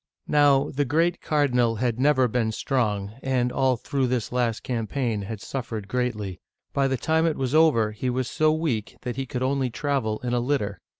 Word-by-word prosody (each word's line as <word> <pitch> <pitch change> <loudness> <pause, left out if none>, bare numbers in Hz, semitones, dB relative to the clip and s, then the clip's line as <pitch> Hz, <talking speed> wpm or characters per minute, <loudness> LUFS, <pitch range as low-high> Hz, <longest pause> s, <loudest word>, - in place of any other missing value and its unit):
Now, 145 -2 +4
the 145 +1 0
great 165 +6 +1
cardinal 125 -6 +2
had 120 +1 -1
never 130 -2 +4
been 115 -1 0
strong, 105 -5 -1
and 125 -2 0
all 130 -1 +2
through 130 +2 -1
this 125 -3 -1
last 120 -3 0
campaign 115 -2 -2
had 100 +2 -6
suffered 115 -5 -5
greatly. 105 -5 -2 0.3
By 140 -1 +2
the 130 -1 0
time 160 +5 +2
it 160 - -1
was 130 0 -2
over, 150 -9 +4
he 120 +4 -3
was 125 0 -1
so 155 +3 +2
weak 155 -10 -2
that 125 - -3
he 135 -1 -3
could 125 0 -3
only 135 -1 0
travel 125 -4 -1
in 120 -1 -1
a 120 - +2
litter. 120 - -1
125 Hz, 190 wpm, -25 LUFS, 115-140 Hz, 0.3 s, Now